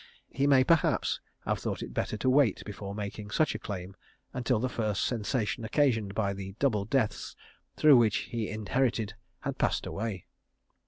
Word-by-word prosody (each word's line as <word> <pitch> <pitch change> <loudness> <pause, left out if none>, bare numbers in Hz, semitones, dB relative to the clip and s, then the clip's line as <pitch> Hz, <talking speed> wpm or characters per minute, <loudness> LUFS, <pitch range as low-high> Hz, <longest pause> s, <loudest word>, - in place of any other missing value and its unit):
He 140 +1 +1
may 135 -2 +6
perhaps 165 +2 +2 0.3
have - - 0
thought - - -3
it - - -8
better 110 - -2
to 105 - -2
wait 130 -5 +4
before 100 -1 -6
making 105 0 -5
such 155 +7 +2
a 110 - -5
claim 95 -3 -6 0.4
until 125 -1 +1
the 130 - 0
first 110 -5 -1
sensation 115 0 -1
occasioned 110 -5 +1
by 100 -2 0
the 95 0 -7
double 110 -8 +1
deaths 110 -1 -1 0.4
through 150 -4 +7
which 115 -4 +4 0.2
he 115 -2 -1
inherited 110 0 0 0.3
had - - -4
passed - - +1
away. 100 -3 -4
110 Hz, 165 wpm, -29 LUFS, 100-130 Hz, 0.4 s, through